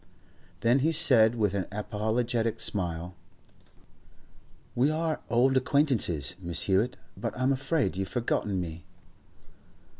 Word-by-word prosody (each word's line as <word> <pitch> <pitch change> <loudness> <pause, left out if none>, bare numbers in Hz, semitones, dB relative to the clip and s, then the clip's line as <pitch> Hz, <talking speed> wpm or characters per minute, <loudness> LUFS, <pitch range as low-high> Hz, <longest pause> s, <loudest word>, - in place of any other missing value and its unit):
Then 120 +4 +3
he 155 +5 +2
said 120 -7 +4
with 105 -4 0
an 95 -3 -2
apologetic 110 +2 -1
smile: 90 -2 0 1.6
'We 130 +4 +2
are 160 0 -1
old 130 +3 +3
acquaintances, 130 - +1
Miss 85 -1 -1
Hewett, 100 +8 +1 0.2
but 115 - -5
I'm 130 +2 +2
afraid 135 - -1
you've 95 0 -2
forgotten 105 -5 -1
me. 85 -1 -6
115 Hz, 115 wpm, -28 LUFS, 95-130 Hz, 1.6 s, said